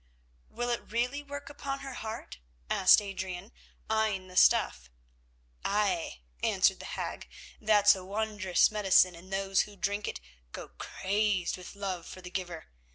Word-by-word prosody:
"Will 240 0 -2
it 235 - -4
really 250 +5 0
work 285 0 -8
upon 280 -1 -5
her 270 -1 -6
heart?" 220 - -7 0.3
asked 190 +3 +6
Adrian, 190 0 -5 0.4
eyeing 215 -4 0
the 180 - -12
stuff. 65 - +4 0.7
"Ay," 195 - 0 0.2
answered - - +3
the - - -8
hag, - - -5 0.3
"that's 210 -1 +6
a 190 - -7
wondrous 205 -2 +1
medicine, 190 -3 +4
and 175 +3 -13
those 195 0 +2
who 205 - -14
drink 200 +2 -2
it - - -4 0.3
go - - -7
crazed 200 -2 -1
with 180 +2 -10
love 190 -4 -4
for - - -9
the 180 -1 -10
giver. 180 - -5
200 Hz, 150 wpm, -30 LUFS, 185-220 Hz, 0.7 s, asked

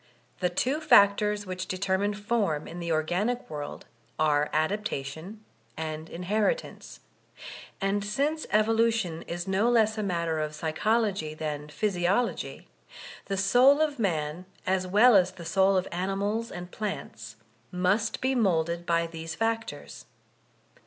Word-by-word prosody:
The 180 - +1
two 255 - 0
factors 210 -6 +4
which 185 0 -5
determine 195 +2 0
form 205 -8 -1
in 175 - -8
the 170 -1 -3
organic 180 +10 0
world 145 -1 -6 0.3
are 150 -1 +2
adaptation 175 +2 -3 0.3
and 155 0 -5
inheritance; 210 - -2 0.8
and 200 +1 0
since 285 +10 -1
evolution 220 -5 +2
is 175 +1 -4
no 195 +5 +2
less 220 -2 +3
a - - 0
matter 170 -5 -1
of 155 0 -3
psychology 175 +1 0
than 150 -1 -4
physiology, 200 +6 -1 0.6
the 195 - -3
soul 250 +9 +5
of 300 -4 0
man 165 -3 -1 0.2
as 185 0 0
well 215 +5 +6
as 185 -1 +4
the 170 - -10
soul 190 +3 +3
of 185 - 0
animals 200 +5 -2
and 180 0 -8
plants, 115 - -6 0.4
must 185 +5 0
be 260 +1 +1
moulded 170 -7 +1
by 170 0 +2
these 165 -1 -7
factors. 225 0 -3
190 Hz, 130 wpm, -27 LUFS, 165-215 Hz, 0.8 s, well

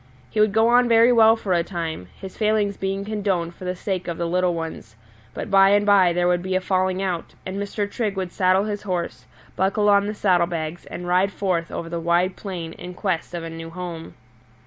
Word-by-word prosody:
He - - -2
would 215 -1 +4
go 220 +2 +3
on 245 0 +4
very 230 +1 +6
well 225 -1 +6
for 205 -5 -2
a 170 -1 +2
time, 165 - -5
his 190 -1 -9
failings 210 -2 +1
being 195 +1 -3
condoned 195 -5 -1
for 185 - -11
the 180 0 -2
sake 185 0 -3
of 170 -1 -3
the 170 - -2
little 180 +1 +1
ones; 160 -9 -6 0.4
but 215 - -5
by 195 0 +6
and 205 +1 +3
by 195 -3 +5
there 175 +1 +1
would 175 0 +2
be 185 +1 -2
a - - +3
falling 185 0 0
out, 180 -3 -3
and 190 +1 -5
Mr. 200 +1 -2
Trigg 205 -1 -3
would 185 -2 -3
saddle 185 +1 +2
his 210 -1 -3
horse, 180 -4 -4 0.3
buckle 200 +3 +2
on 200 0 +4
the 210 - -3
saddle 180 -4 +2
bags, 165 -1 -5
and 175 - -7
ride 185 +3 +2
forth 180 -5 -1
over 165 - -5
the 170 0 -4
wide 175 +2 +1
plain 175 -5 -6
in 180 0 -9
quest 180 -3 -2
of 170 - -4
a 165 - -5
new 165 0 -7
home. 170 -1 -7
185 Hz, 225 wpm, -23 LUFS, 175-205 Hz, 0.4 s, very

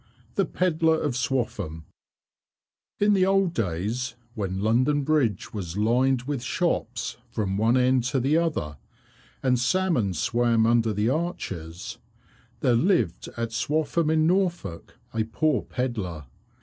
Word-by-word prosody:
The 195 - +1
Pedlar 160 -3 +2
of 145 -4 -1
Swaffham 115 - -2 1.2
In 205 0 +4
the 190 -1 +3
old 195 -3 +2
days 110 - -2 0.2
when 95 -4 -3
London 130 +7 +2
Bridge 135 -10 0
was 95 -4 -5
lined 125 +4 +2
with 140 -1 -3
shops 165 +7 -1
from 95 -3 -2
one 115 +5 +3
end 130 0 +3
to 130 +2 +1
the 135 +5 +2
other, 150 - 0 0.7
and 125 -2 +3
salmon 125 - +1
swam 115 +6 +2
under 115 -1 +3
the 105 +2 +1
arches, 100 - -4 0.6
there 125 - +3
lived 120 - +1
at 115 -1 -2
Swaffham, 155 +5 0
in 155 0 +3
Norfolk, 175 - -1 0.2
a 110 - +1
poor 125 +3 +1
pedlar. 105 - -4
125 Hz, 130 wpm, -26 LUFS, 105-155 Hz, 1.2 s, In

